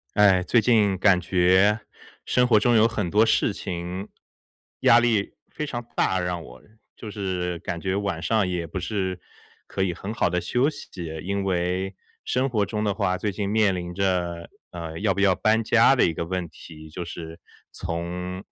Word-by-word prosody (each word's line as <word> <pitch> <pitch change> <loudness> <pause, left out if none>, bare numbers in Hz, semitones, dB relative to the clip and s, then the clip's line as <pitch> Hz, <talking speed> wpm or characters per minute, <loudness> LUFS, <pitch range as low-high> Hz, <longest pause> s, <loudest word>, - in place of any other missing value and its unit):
唉， 95 -3 +5
最 115 +4 +3
近 105 -4 +3
感 95 -3 +5
觉 95 +4 +3 0.4
生 125 - +2
活 110 -4 +5
中 120 +2 +3
有 110 0 +6
很 105 -6 -2
多 105 +4 +4
事 110 - +2
情 90 0 -5 0.7
压 115 - +7
力 115 -4 +1 0.2
非 150 - -4
常 120 -5 -5
大 95 - +1
让 90 -1 -3
我， - - -13 0.3
就 110 - -8
是 90 -4 -3
感 85 - -5
觉 95 +2 -1
晚 100 -5 -2
上 105 +2 +1
也 90 -2 -3
不 90 - -5
是 95 -1 -3 0.5
可 95 - -4
以 95 -2 +1
很 95 +5 -6
好 110 - +1
地 90 +1 0
休 125 - +1
息。 145 - -11 0.3
因 100 +1 -2
为 90 +1 -1 0.3
生 130 +2 0
活 110 -6 0
中 105 +1 -2
的 105 -1 +1
话 95 -3 0
最 105 +2 -2
近 100 0 -3
面 105 -2 +3
临 90 -1 -5
着， 90 -2 -1 0.2
呃， 85 -2 -7
要 100 -2 +1
不 - - -3
要 95 -2 +5
搬 110 +3 +2
家 115 +4 +5
的 125 - +4
一 80 - 0
个 85 - -3
问 90 0 -3
题， 80 -1 -13
就 90 - -5
是 80 -1 -8 0.3
从 90 +3 -5
95 Hz, 200 characters per minute, -24 LUFS, 90-105 Hz, 0.7 s, 压